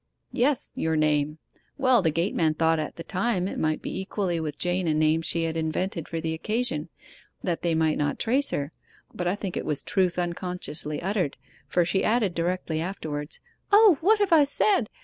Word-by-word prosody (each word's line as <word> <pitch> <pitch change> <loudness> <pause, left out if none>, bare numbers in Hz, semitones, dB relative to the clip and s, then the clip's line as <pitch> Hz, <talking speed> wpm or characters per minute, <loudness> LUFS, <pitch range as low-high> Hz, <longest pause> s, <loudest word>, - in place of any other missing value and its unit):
'Yes 260 +2 0
your 160 0 0
name. 150 0 +1 0.4
Well, 255 -4 +4
the 165 - +2
gateman 165 -1 +1
thought 165 0 +2
at 155 - -4
the 165 - -7
time 185 0 -1
it - - -4
might 155 0 0
be - - -4
equally 190 -3 -2
with 155 -2 -4
Jane 180 0 0
a 155 - +2
name 155 +1 +3
she 165 0 +1
had 165 0 -2
invented 165 +1 -2
for 165 - -3
the 160 0 -2
occasion, 175 -3 -2 0.5
that 175 -3 -1
they 170 -2 +1
might 160 -1 +1
not 145 -1 0
trace 265 +5 +1
her; 145 +2 -2 0.4
but 180 - -3
I 180 - +1
think 195 -3 -5
it - - -2
was 150 - -2
truth 185 -3 +1
unconsciously 175 -3 -3
uttered, 190 -6 -1 0.3
for 175 -1 +2
she 190 +3 0
added 215 -5 +2
directly 170 -2 -1
afterwards: 155 -5 -5 0.3
"O, 410 -7 +7
what 425 +6 +5
have 405 -4 +2
I 310 -3 +7
said!" 285 - +2
175 Hz, 190 wpm, -26 LUFS, 160-205 Hz, 0.5 s, O